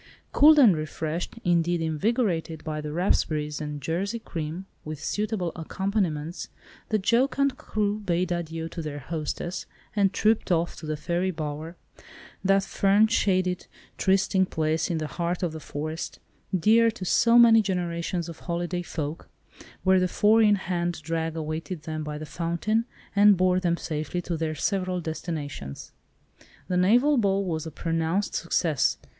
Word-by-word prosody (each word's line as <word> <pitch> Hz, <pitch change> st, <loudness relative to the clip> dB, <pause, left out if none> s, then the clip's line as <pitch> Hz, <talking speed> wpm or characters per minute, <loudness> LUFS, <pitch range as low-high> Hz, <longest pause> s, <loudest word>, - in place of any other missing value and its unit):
Cooled 305 Hz, +2 st, +7 dB
and 235 Hz, -, +7 dB
refreshed, 155 Hz, +3 st, -4 dB
indeed 175 Hz, -1 st, +2 dB
invigorated 165 Hz, -, -1 dB
by 155 Hz, -1 st, -3 dB
the 150 Hz, 0 st, -5 dB
raspberries 155 Hz, -3 st, 0 dB
and 150 Hz, -1 st, -4 dB
Jersey 195 Hz, -, -1 dB
cream, 170 Hz, -4 st, -5 dB, 0.2 s
with 155 Hz, -1 st, -6 dB
suitable 205 Hz, +1 st, -2 dB
accompaniments, 175 Hz, -2 st, -2 dB, 0.4 s
the 215 Hz, -, +2 dB
jocund 260 Hz, +6 st, +2 dB
crew 210 Hz, -4 st, -1 dB
bade 180 Hz, -2 st, -1 dB
adieu 165 Hz, -1 st, -3 dB
to 165 Hz, -, -6 dB
their 150 Hz, -2 st, -5 dB
hostess, 160 Hz, +4 st, -4 dB, 0.3 s
and 200 Hz, -2 st, +3 dB
trooped 215 Hz, 0 st, +1 dB
off 170 Hz, 0 st, +1 dB
to 155 Hz, -, -8 dB
the 155 Hz, 0 st, -2 dB
Fairy 175 Hz, +4 st, -1 dB
Bower, 155 Hz, 0 st, -5 dB, 0.7 s
that 195 Hz, 0 st, +3 dB
fern 200 Hz, +2 st, +3 dB
shaded 185 Hz, -5 st, +1 dB, 0.3 s
trysting 190 Hz, 0 st, +2 dB
place 160 Hz, +2 st, 0 dB
in 170 Hz, -, 0 dB
the 155 Hz, -, -2 dB
heart 170 Hz, +5 st, -3 dB
of 175 Hz, -, 0 dB
the 160 Hz, -, -7 dB
forest, 155 Hz, +2 st, -5 dB, 0.4 s
dear 225 Hz, +6 st, +5 dB
to 215 Hz, -4 st, -6 dB
so 235 Hz, +6 st, +4 dB
many 230 Hz, -2 st, +8 dB
generations 175 Hz, -3 st, -2 dB
of 170 Hz, -, -9 dB
holiday 175 Hz, 0 st, -2 dB
folk, 160 Hz, -2 st, -5 dB, 0.5 s
where 190 Hz, 0 st, +5 dB
the 185 Hz, -, +2 dB
four 215 Hz, +5 st, +4 dB
in 210 Hz, -1 st, +5 dB
hand 175 Hz, -3 st, -2 dB
drag 165 Hz, 0 st, -2 dB
awaited 160 Hz, +1 st, -4 dB
them 155 Hz, -1 st, -4 dB
by 150 Hz, 0 st, -5 dB
the 155 Hz, -, -6 dB
fountain, 170 Hz, +8 st, -1 dB, 0.3 s
and 205 Hz, -1 st, +6 dB
bore 185 Hz, 0 st, +3 dB
them 170 Hz, -2 st, 0 dB
safely 155 Hz, +2 st, -3 dB
to 175 Hz, -1 st, -3 dB
their 160 Hz, -1 st, -2 dB
several 185 Hz, +2 st, -1 dB
destinations. 155 Hz, -, -5 dB, 0.8 s
The 180 Hz, -, +1 dB
naval 245 Hz, +11 st, +4 dB
ball 200 Hz, -3 st, +2 dB
was 160 Hz, -3 st, -3 dB
a -, -, -6 dB
pronounced 165 Hz, +5 st, -1 dB
success. 165 Hz, -3 st, +1 dB
175 Hz, 150 wpm, -26 LUFS, 160-195 Hz, 0.8 s, many